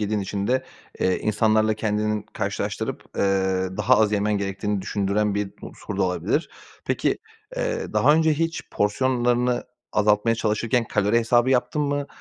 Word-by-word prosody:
yediğin 105 0 0
için 100 +1 -3
de, 130 +3 +1 0.4
eee, 95 - +2
insanlarla 110 0 +2
kendini 105 -1 -1
karşılaştırıp, - - -3
ııı, 95 -1 0
daha 130 +1 +4
az 110 -1 +3
yemen 105 0 +1
gerektiğini 100 0 -2
düşündüren 100 +1 0
bir 100 -1 -2
unsur 105 - -7
da 100 - +1
olabilir. 90 - 0 0.3
Peki, - - 0 0.4
eee, - - -2
daha 150 - +5
önce 160 0 +3
hiç 165 +2 -1
porsiyonlarını 120 +3 +1 0.3
azaltmaya 105 +2 +3
çalışırken 115 +2 0
kalori 105 +1 +2
hesabı 120 +2 +3
yaptın 125 +3 +1
mı? 145 0 -1
105 Hz, 145 wpm, -24 LUFS, 100-125 Hz, 0.4 s, daha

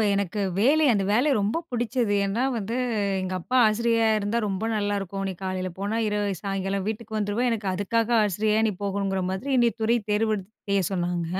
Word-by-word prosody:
எனக்கு 200 +1 -1 0.2
வேலை 290 +9 +4
அந்த 200 -3 +1
வேலை 245 +8 +3
ரொம்ப 210 +10 0
பிடிச்சது. 240 -2 0
ஏன்னா 205 +5 -1
வந்து, 220 +1 -3 0.5
எங்க 185 0 -3
அப்பா 255 +9 -2
"ஆசிரியரா 230 +1 +2
இருந்தா 210 +3 -1
ரொம்ப 195 +1 -2
நல்லாயிருக்கும். 200 -2 -2
நீ - - -2
காலையில 185 0 -2
போனா 205 +3 -2
இரவு 205 -2 -1
சாயங்காலம் 195 0 -2
வீட்டுக்கு 220 0 -5
வந்துருவே!" 210 +3 0
எனக்கு 220 -3 -2
அதுக்காக 220 +5 0
ஆசிரியரா 210 +2 +1
நீ - - -1
போகணுங்கிற 195 -1 -1
மாதிரி 190 +9 -4
என்னைய 240 -2 +4
துறை 230 +2 +3
தேர்வெடுத் 210 -2 0 0.2
செய்ய 200 0 +2
சொன்னாங்க. 175 -2 -1
205 Hz, 170 wpm, -25 LUFS, 195-225 Hz, 0.5 s, வேலை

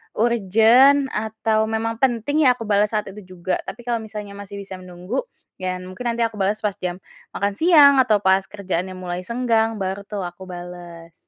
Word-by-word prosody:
urgen 235 +5 +4
atau 220 0 0
memang 225 +1 -2
penting 265 +4 +2
ya 250 - +5
aku 230 - -7
bales 210 +1 +2
saat 210 -1 -1
itu 190 -2 -12
juga. 180 +1 -1
Tapi 240 - -8
kalau 235 -1 0
misalnya 210 -2 -8
masih 200 0 -8
bisa 195 -1 -8
menunggu, 185 - -5 0.4
ya 185 0 -3
mungkin 185 +6 -9
nanti 235 - -7
aku 225 -1 -4
bales 205 +1 0
pas 205 -2 -2
jam 180 0 -4 0.4
makan 200 0 0
siang, 300 - +7
atau 215 -4 +2
pas 190 0 +4
kerjaannya 190 -2 -4
mulai 180 0 -4
senggang, 225 -1 0
baru 190 +1 -3
tuh 205 -2 -5
aku 175 +2 -8
bales. 175 -2 -9
205 Hz, 180 wpm, -22 LUFS, 185-230 Hz, 0.4 s, siang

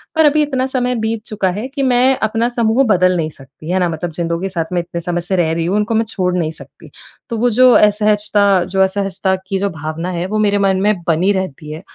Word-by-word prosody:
पर 320 - +4
अभी 300 +1 +4
इतना 260 -3 -1
समय 250 -1 -1
बीत 220 -1 -2
चुका 210 -5 -1
है 240 +5 -4
कि 275 0 -4
मैं 255 +1 +3
अपना 225 +2 0
समूह 235 +2 +1
बदल 185 -2 +3
नहीं 155 -1 -1
सकती। 140 +2 -13
है 190 - +1
ना? 175 -1 +1
मतलब 165 +1 -4
जिन 170 +1 -3
लोग 170 +3 -2
साथ 175 -2 -4
मैं 175 - +1
इतने 170 0 -6
समय 175 0 -2
से 190 +2 -2
रह 160 -2 +1
रही 165 0 -2
हूँ, 185 - 0
उनको 210 +2 0
मैं 225 +1 +2
छोड़ 180 -3 -1
नहीं 160 -2 -1
सकती, - - -14 0.4
तो 230 - -3
वो 245 +2 +2
जो 255 - +8
असहजता 210 0 +3 0.2
जो 190 +1 -1
असहजता 190 0 0
की 195 0 -1
जो 200 - 0
भावना 160 +2 -5
है 175 - -2
वो 215 +2 -2
मेरे 205 0 +1
मन 190 0 +1
में 210 +1 +3
बनी 170 +5 +2
रहती 155 -5 -5
है। 155 +2 -7
195 Hz, 245 wpm, -17 LUFS, 170-225 Hz, 0.4 s, जो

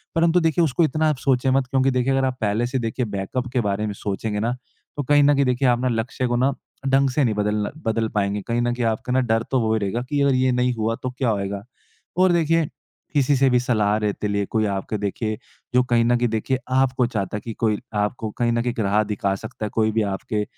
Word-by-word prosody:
परंतु 165 +1 +4
देखिए 165 0 +2
उसको 155 +3 +1
इतना 155 +1 +2
आप 150 - 0
सोचें 130 0 +1
मत 135 0 +2
क्योंकि 135 0 +2
देखिए 125 +1 +1
अगर 135 0 +2
आप 130 -1 -2
पहले 110 +3 +1
से 130 +1 -2
देखिए 120 +2 -2
बैकअप 105 +5 -3
के 125 - +2
बारे 105 0 -1
में 105 - -3
सोचेंगे 105 +1 -3
ना 115 +3 0 0.4
तो 145 - -1
कहीं 145 +2 +4
न 145 +1 +5
कहीं 140 0 +2
देखिए 125 +1 +1
आप 120 -1 +3
ना 130 - 0
लक्ष्य 115 +2 -1
को 120 - 0
ना 130 +3 +2 0.3
ढंग 135 0 +3
से 140 +3 +1
नहीं 115 -4 +1
बदलना 105 0 0 0.2
बदल 110 0 +1
पाएँगे। 100 0 0
कहीं 120 +1 0
न 120 0 0
कहीं 120 -1 -2
आपका 115 +2 -1
ना 130 - +3
डर 115 -2 +1
तो 130 - +3
वो 110 -1 +1
ही 110 - +1
रहेगा 105 +4 -2
कि 145 -1 0
अगर 140 -1 +3
ये 130 0 +2
नहीं 125 0 +1
हुआ 115 0 -1
तो 130 - -1
क्या 130 -1 -1
होएगा? 100 -1 -2 0.5
और 185 0 +5
देखिए 165 -1 +2 0.5
किसी 145 -1 +3
से 135 0 +4
भी 125 - +3
सलाह 110 -4 +1
लेते 105 0 -2
लिए 100 0 0
कोई 110 +2 0
आपके 100 +1 -2
देखिए 105 +2 -2 0.4
जो 125 - +5
कहीं 120 -2 +2
न 120 +1 +3
कहीं 120 0 +1
देखिए 110 +4 -1
आपको 130 -1 +2
चाहता 105 -3 -3
कि 115 +2 -7
कोई 110 -1 0 0.2
आपको 110 +1 -2
कहीं 120 -1 +1
न 115 0 +1
कहीं 120 - -1
एक - - -8
राह 105 0 +2
दिखा 100 -2 -1
सकता 110 - -6
है। - - -3
कोई 110 -1 +2
भी 110 +1 +1
आपके 105 +2 -2
120 Hz, 250 wpm, -22 LUFS, 105-130 Hz, 0.5 s, न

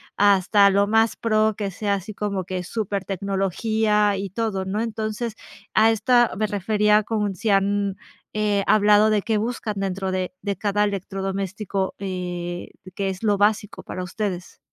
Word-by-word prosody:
hasta 200 0 +5
lo 200 +1 +3
más 225 +1 +3
pro 215 -1 +2
que 205 -2 -2
sea 200 +2 -1
así 200 +2 -6
como 200 -2 -2
que 180 0 -4
supertecnología 200 +1 0
y 195 0 -4
todo, 205 -3 -2
¿no?, 200 +3 -2
entonces, 220 0 -3 0.4
a 220 +1 +6
esta 240 +2 +3
me 215 - +1
refería 210 +1 +2
con 210 -2 -1
si 215 +5 -2
han, 200 0 +1 0.4
eh, 210 -2 +1
hablado 210 0 +5
de 210 -1 +2
qué 220 -2 0
buscan 220 -1 -3
dentro 190 -1 -2
de 185 -1 -2
de 200 -1 -2
cada 205 +2 0
electrodoméstico, 195 0 -3
eh, 180 -2 -4 0.3
qué 195 -1 -1
es 190 -1 -5
lo 205 -2 +2
básico 205 +1 +1
para 185 - -5
ustedes. 185 -1 -4
205 Hz, 155 wpm, -23 LUFS, 195-215 Hz, 0.4 s, a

